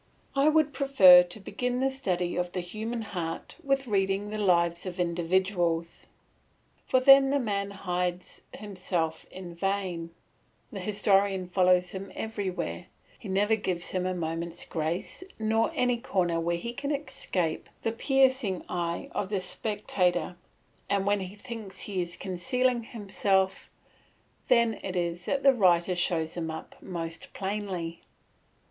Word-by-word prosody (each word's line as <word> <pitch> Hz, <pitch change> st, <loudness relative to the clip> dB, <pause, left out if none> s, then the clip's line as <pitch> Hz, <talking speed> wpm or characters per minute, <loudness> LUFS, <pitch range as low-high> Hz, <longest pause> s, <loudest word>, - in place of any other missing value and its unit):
I 275 Hz, +2 st, +5 dB
would 310 Hz, -2 st, +3 dB
prefer 260 Hz, -10 st, +8 dB
to 180 Hz, +4 st, -6 dB
begin 245 Hz, +5 st, -2 dB
the 270 Hz, +1 st, +1 dB
study 180 Hz, -10 st, -1 dB
of 180 Hz, 0 st, -2 dB
the 185 Hz, -, -2 dB
human 220 Hz, +6 st, -4 dB
heart 170 Hz, -5 st, -5 dB
with 275 Hz, -1 st, +1 dB
reading 200 Hz, -1 st, 0 dB
the 215 Hz, -, -3 dB
lives 170 Hz, -2 st, +2 dB
of 180 Hz, 0 st, -6 dB
individuals; 175 Hz, -1 st, 0 dB, 0.8 s
for 255 Hz, -, +4 dB
then 270 Hz, +1 st, +8 dB
the 285 Hz, -, +2 dB
man 200 Hz, -6 st, -1 dB
hides 180 Hz, -2 st, -3 dB, 0.2 s
himself 180 Hz, -5 st, -3 dB
in 180 Hz, -2 st, -9 dB
vain, 185 Hz, -2 st, -2 dB, 0.6 s
the -, -, -6 dB
historian 195 Hz, -2 st, +2 dB
follows 180 Hz, 0 st, +3 dB
him 195 Hz, 0 st, -7 dB
everywhere; 190 Hz, -, -4 dB, 0.3 s
he -, -, -8 dB
never 205 Hz, +3 st, +3 dB
gives 185 Hz, -5 st, -3 dB
him 185 Hz, -1 st, -1 dB
a 185 Hz, -, -1 dB
moment's 165 Hz, 0 st, -3 dB
grace 165 Hz, -, -3 dB
nor 225 Hz, +4 st, +1 dB
any 250 Hz, -3 st, +2 dB
corner 185 Hz, -9 st, 0 dB
where 170 Hz, +1 st, 0 dB
he 235 Hz, +7 st, -5 dB
can 280 Hz, +3 st, -4 dB
escape 185 Hz, -, -2 dB
the 225 Hz, -, +1 dB
piercing 260 Hz, -5 st, +2 dB
eye 170 Hz, -1 st, -2 dB
of 195 Hz, -, -2 dB
the 200 Hz, -2 st, 0 dB
spectator; 185 Hz, -2 st, 0 dB, 0.5 s
and 200 Hz, -1 st, +1 dB
when 205 Hz, 0 st, +2 dB
he 190 Hz, +1 st, -6 dB
thinks 220 Hz, -3 st, -7 dB
he 195 Hz, -3 st, -2 dB
is 175 Hz, 0 st, -5 dB
concealing 245 Hz, +6 st, 0 dB
himself, 195 Hz, -3 st, 0 dB, 0.8 s
then 235 Hz, -2 st, +3 dB
it 190 Hz, -1 st, -4 dB
is 175 Hz, 0 st, -2 dB
that 275 Hz, -, -1 dB
the 275 Hz, -1 st, +7 dB
writer 180 Hz, -5 st, +3 dB
shows 170 Hz, -2 st, 0 dB
him 165 Hz, -2 st, -3 dB
up 160 Hz, -, -7 dB
most 165 Hz, -3 st, -6 dB
plainly. 190 Hz, -4 st, -4 dB
190 Hz, 145 wpm, -28 LUFS, 175-220 Hz, 0.8 s, prefer